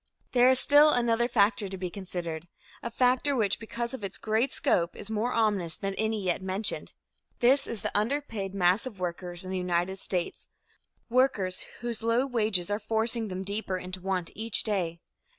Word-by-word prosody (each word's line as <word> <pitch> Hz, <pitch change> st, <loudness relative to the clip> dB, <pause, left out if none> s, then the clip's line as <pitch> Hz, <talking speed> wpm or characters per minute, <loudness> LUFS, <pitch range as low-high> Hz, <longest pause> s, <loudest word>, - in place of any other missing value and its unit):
There 250 Hz, 0 st, +5 dB
is 260 Hz, 0 st, +7 dB
still 290 Hz, +3 st, +7 dB
another 235 Hz, -3 st, +2 dB
factor 210 Hz, -3 st, +2 dB
to 190 Hz, 0 st, -5 dB
be 180 Hz, -1 st, -4 dB
considered 175 Hz, -4 st, -5 dB, 0.3 s
a 235 Hz, -, -4 dB
factor 255 Hz, +4 st, +2 dB
which 210 Hz, -5 st, +1 dB
because 235 Hz, +2 st, -4 dB
of 260 Hz, -, -7 dB
its 195 Hz, -1 st, -5 dB
great 220 Hz, +4 st, 0 dB
scope 170 Hz, -1 st, 0 dB
is 210 Hz, -, -9 dB
more 220 Hz, +3 st, -1 dB
ominous 205 Hz, -8 st, +1 dB
than 195 Hz, 0 st, -3 dB
any 220 Hz, 0 st, -1 dB
yet 180 Hz, 0 st, 0 dB
mentioned. 190 Hz, +3 st, -2 dB, 0.5 s
This 270 Hz, +3 st, +4 dB
is 230 Hz, -3 st, -2 dB
the -, -, -3 dB
underpaid 215 Hz, -4 st, -1 dB
mass 185 Hz, +5 st, +2 dB
of 210 Hz, -7 st, -10 dB
workers 175 Hz, 0 st, -3 dB
in 185 Hz, -, -6 dB
the 190 Hz, -, -1 dB
United 180 Hz, +1 st, -1 dB
States 180 Hz, -2 st, -2 dB, 0.6 s
workers 230 Hz, -7 st, +1 dB, 0.2 s
whose 235 Hz, -2 st, -3 dB
low 230 Hz, +3 st, +2 dB
wages 215 Hz, -8 st, 0 dB
are 205 Hz, -, 0 dB
forcing 225 Hz, +1 st, 0 dB
them 185 Hz, -1 st, -5 dB
deeper 200 Hz, -1 st, -3 dB
into 185 Hz, 0 st, -7 dB
want 185 Hz, -2 st, -2 dB
each 225 Hz, 0 st, 0 dB
day. 175 Hz, -6 st, -2 dB
205 Hz, 180 wpm, -28 LUFS, 185-235 Hz, 0.6 s, is